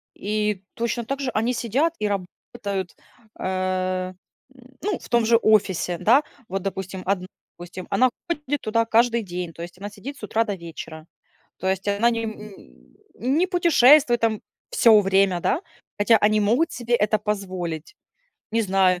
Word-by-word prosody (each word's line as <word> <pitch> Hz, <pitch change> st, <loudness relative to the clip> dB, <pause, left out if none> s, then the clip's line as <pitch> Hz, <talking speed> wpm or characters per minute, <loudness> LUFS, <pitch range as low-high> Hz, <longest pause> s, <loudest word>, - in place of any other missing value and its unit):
И 210 Hz, -1 st, -2 dB
точно 235 Hz, 0 st, -2 dB
также 275 Hz, +1 st, -2 dB
они 230 Hz, +3 st, 0 dB
сидят 270 Hz, +9 st, 0 dB
и 210 Hz, -, 0 dB
работают, 195 Hz, 0 st, -5 dB, 0.4 s
э, 185 Hz, 0 st, -1 dB
м, -, -, -29 dB, 0.7 s
ну, 410 Hz, -1 st, -1 dB
в -, -, -13 dB
том 235 Hz, -1 st, +3 dB
же 230 Hz, +1 st, +5 dB
офисе. 195 Hz, -6 st, +2 dB
Да, 255 Hz, +7 st, +5 dB, 0.2 s
вот, 195 Hz, +1 st, -3 dB
допустим, 190 Hz, 0 st, -5 dB
1 185 Hz, -1 st, -1 dB, 0.3 s
допустим, 175 Hz, +1 st, -8 dB
она 255 Hz, 0 st, +3 dB, 0.2 s
ходит 290 Hz, -4 st, -2 dB
туда 230 Hz, +1 st, +1 dB
каждый 235 Hz, +1 st, +3 dB
день. 180 Hz, -2 st, -5 dB
То 165 Hz, -, -9 dB
есть, 175 Hz, +1 st, -10 dB
она 205 Hz, +1 st, -6 dB
сидит 220 Hz, +8 st, -8 dB
с -, -, -16 dB
утра 225 Hz, +1 st, +1 dB
до 205 Hz, -3 st, -3 dB
вечера. 165 Hz, -2 st, -9 dB, 0.5 s
То 185 Hz, -, -4 dB
есть, 190 Hz, +1 st, -2 dB
она 205 Hz, +4 st, +3 dB
не, 230 Hz, -1 st, -2 dB
м, 220 Hz, -, -3 dB, 0.8 s
н 260 Hz, +5 st, 0 dB
не 360 Hz, +3 st, +3 dB
путешествует 300 Hz, -8 st, +5 dB
там 220 Hz, -2 st, +1 dB, 0.3 s
всё 230 Hz, -, +6 dB
время, 195 Hz, -2 st, +2 dB
да, 310 Hz, -, +1 dB, 0.4 s
хотя 210 Hz, +2 st, +5 dB
они 215 Hz, +1 st, +3 dB
могут 235 Hz, +10 st, +2 dB
себе 240 Hz, 0 st, 0 dB
это 215 Hz, -1 st, +2 dB
позволить. 185 Hz, -, -4 dB, 0.6 s
Не 230 Hz, -, +1 dB
знаю. 190 Hz, -2 st, +2 dB
210 Hz, 165 wpm, -23 LUFS, 185-235 Hz, 0.8 s, всё